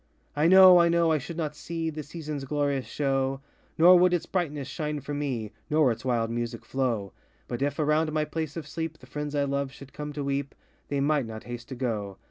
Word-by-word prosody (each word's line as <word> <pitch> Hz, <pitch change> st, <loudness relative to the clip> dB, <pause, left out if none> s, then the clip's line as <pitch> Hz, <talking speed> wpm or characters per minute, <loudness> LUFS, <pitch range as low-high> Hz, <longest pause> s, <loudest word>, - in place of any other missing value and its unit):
I 150 Hz, +2 st, +3 dB
know, 185 Hz, 0 st, +9 dB
I 170 Hz, 0 st, +5 dB
know 170 Hz, -1 st, +3 dB
I 155 Hz, -, +2 dB
should 165 Hz, +5 st, -7 dB
not 155 Hz, -3 st, -2 dB
see 165 Hz, +1 st, -4 dB
The 155 Hz, 0 st, -5 dB
seasonŌĆÖs 150 Hz, -2 st, -6 dB
glorious 140 Hz, -2 st, 0 dB
show, 135 Hz, -1 st, 0 dB, 0.4 s
Nor 175 Hz, +2 st, +8 dB
would 180 Hz, 0 st, +4 dB
its 175 Hz, -, -2 dB
brightness 150 Hz, -7 st, -2 dB
shine 150 Hz, +2 st, -3 dB
for 145 Hz, +2 st, -6 dB
me; 130 Hz, -7 st, -3 dB, 0.2 s
Nor 150 Hz, -4 st, +4 dB
its 115 Hz, 0 st, -5 dB
wild 115 Hz, -3 st, 0 dB
music 120 Hz, 0 st, -4 dB
flow; 120 Hz, -7 st, -1 dB, 0.3 s
But 120 Hz, -, -4 dB
if, 140 Hz, 0 st, 0 dB
around 155 Hz, +1 st, +2 dB
my 155 Hz, 0 st, 0 dB
place 155 Hz, 0 st, -4 dB
of 155 Hz, -3 st, -6 dB
sleep, 160 Hz, 0 st, -4 dB
The -, -, -16 dB
friends 150 Hz, 0 st, -5 dB
I 145 Hz, -, +2 dB
love 140 Hz, -1 st, -1 dB
should 140 Hz, -1 st, -13 dB
come 150 Hz, 0 st, -5 dB
to 145 Hz, 0 st, -4 dB
weep, 140 Hz, 0 st, -2 dB, 0.3 s
They 140 Hz, -1 st, -1 dB
might 145 Hz, -3 st, +1 dB
not 110 Hz, -1 st, -7 dB
haste 120 Hz, 0 st, -8 dB
to 130 Hz, -, -5 dB
go. 105 Hz, -6 st, -3 dB
145 Hz, 220 wpm, -27 LUFS, 130-155 Hz, 0.4 s, know